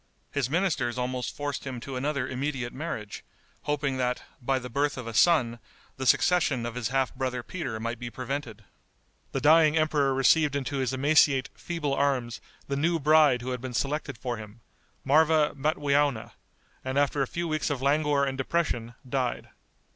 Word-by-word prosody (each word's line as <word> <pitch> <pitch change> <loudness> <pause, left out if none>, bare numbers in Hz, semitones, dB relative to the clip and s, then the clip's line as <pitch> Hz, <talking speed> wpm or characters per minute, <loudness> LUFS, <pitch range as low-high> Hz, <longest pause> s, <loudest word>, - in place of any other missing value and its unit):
His 140 -3 -1
ministers 145 -8 0
almost 125 0 -3
forced 145 -2 -3
him 130 -3 -5
to 135 +1 -6
another 140 0 -1
immediate 130 -2 -3
marriage, 130 -9 -5 0.4
hoping 145 -2 -1
that, 125 -1 -1 0.2
by 135 +2 +1
the 125 -1 -5
birth 140 +3 -1
of 125 - -6
a 115 - -6
son, 120 -4 +3 0.4
the 130 -1 -3
succession 140 -2 +3
of 120 - -4
his 120 -2 -2
half 135 +2 0
brother 125 -1 -3
Peter 130 -11 -5
might 115 +1 -4
be 120 - -5
prevented. 125 -3 -5 0.7
The 135 - -2
dying 155 +2 +5
emperor 150 -4 +2
received 140 +2 +3
into 140 0 -2
his 130 -2 0
emaciate, 140 0 +3
feeble 165 -5 -3
arms 135 -4 0 0.3
the 140 - -2
new 165 +4 +1
bride 150 -4 +4
who 130 - -3
had 125 -1 -4
been 130 -2 -6
selected 140 0 -2
for 120 +1 -4
him, 110 +1 -11 0.4
Marva 155 +2 +4
Matweowna, 145 -4 +1 0.5
and 130 +1 -3
after 145 0 +2
a 135 - +1
few 170 +4 -3
weeks 155 -1 -1
of 135 -3 -3
languor 145 0 +2
and 135 -1 -2
depression 125 -6 -1
died. 125 -1 -2
135 Hz, 170 wpm, -27 LUFS, 125-150 Hz, 0.7 s, dying